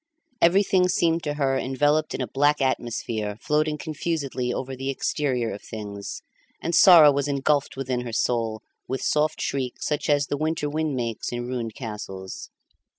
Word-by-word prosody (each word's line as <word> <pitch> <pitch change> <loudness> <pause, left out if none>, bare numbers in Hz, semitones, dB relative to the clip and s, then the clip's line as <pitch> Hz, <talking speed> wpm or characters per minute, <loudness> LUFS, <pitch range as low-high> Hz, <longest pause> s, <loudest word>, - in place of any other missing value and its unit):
Everything 185 +1 +4
seemed 170 -1 +2
to 145 -2 -3
her 135 -2 +1
enveloped 145 +4 +1
in - - -3
a 125 - -2
black 145 +2 +2
atmosphere 115 -5 -2
floating 150 +2 0
confusedly 145 -5 -3
over 130 +2 -4
the 135 +1 -4
exterior 130 -4 -1
of 100 - -8
things, 100 -2 -7 0.4
and 170 - -3
sorrow 170 -4 +9
was 140 0 0
engulfed 140 0 +1
within 130 -2 -2
her 120 -1 -6
soul 115 -1 -1 0.2
with 130 - -3
soft 150 +1 +1
shrieks 130 -3 -3
such 150 0 -1
as 145 -1 +3
the 145 - -2
winter 155 0 -1
wind 155 -1 -1
makes 115 -3 -3
in 120 0 -3
ruined 120 -3 -4
castles. 95 -5 -7
135 Hz, 160 wpm, -25 LUFS, 120-150 Hz, 0.4 s, sorrow